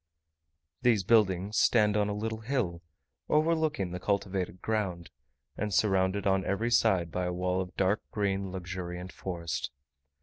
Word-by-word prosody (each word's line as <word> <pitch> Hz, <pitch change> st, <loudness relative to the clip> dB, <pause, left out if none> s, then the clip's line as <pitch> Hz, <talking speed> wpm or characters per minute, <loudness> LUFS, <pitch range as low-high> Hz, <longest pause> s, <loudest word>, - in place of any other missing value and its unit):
These 115 Hz, -6 st, +3 dB
buildings 100 Hz, -1 st, +3 dB
stand 105 Hz, -3 st, +4 dB
on 105 Hz, -1 st, +2 dB
a 100 Hz, -, -2 dB
little 110 Hz, +1 st, -3 dB
hill, 110 Hz, -8 st, -2 dB, 0.5 s
overlooking 155 Hz, -, +1 dB
the 90 Hz, -, -4 dB
cultivated 95 Hz, -2 st, -1 dB
ground, 95 Hz, -7 st, -2 dB, 0.4 s
and 105 Hz, -1 st, -2 dB
surrounded 95 Hz, 0 st, +2 dB
on 95 Hz, -1 st, +2 dB
every 110 Hz, +6 st, -1 dB
side 85 Hz, -7 st, +3 dB
by 90 Hz, +1 st, -1 dB
a 90 Hz, -, -1 dB
wall 90 Hz, +1 st, 0 dB
of 90 Hz, -1 st, -8 dB
dark 100 Hz, +3 st, +2 dB
green 100 Hz, -2 st, -1 dB
luxuriant 90 Hz, -1 st, -5 dB
forest. 85 Hz, -7 st, -4 dB
95 Hz, 140 wpm, -30 LUFS, 90-105 Hz, 0.5 s, stand